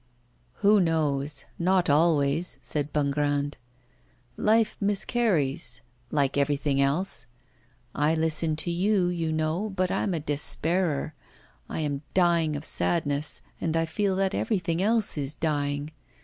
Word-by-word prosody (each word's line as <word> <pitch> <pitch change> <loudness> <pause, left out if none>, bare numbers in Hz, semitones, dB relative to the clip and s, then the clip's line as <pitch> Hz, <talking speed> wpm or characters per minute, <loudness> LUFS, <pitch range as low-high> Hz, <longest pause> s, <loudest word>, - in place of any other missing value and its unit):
'Who 210 +1 +6
knows? 150 -4 -1
not 180 +1 +2
always,' 150 +1 +2
said 150 -1 -1
Bongrand. 145 0 0 0.8
'Life 220 +4 +2
miscarries, 195 - 0 0.3
like 140 -1 +1
everything 140 0 +1
else. 140 0 0 0.7
I 150 +3 +2
listen 160 0 +1
to 175 - -1
you, 185 +1 +2
you 165 -2 -2
know, 155 +6 -1
but 185 -2 -1
I'm 190 - 0
a - - -1
despairer. 155 +2 +1 0.6
I - - -3
am 145 -2 -2
dying 170 -4 +3
of 145 +2 -6
sadness, 150 -3 0 0.2
and 165 -1 0
I 165 - +1
feel 195 +3 -1
that 195 +1 0
everything 175 -5 -1
else 215 -5 +1
is 140 +1 -2
dying. 145 -1 -2
160 Hz, 125 wpm, -26 LUFS, 145-180 Hz, 0.8 s, Who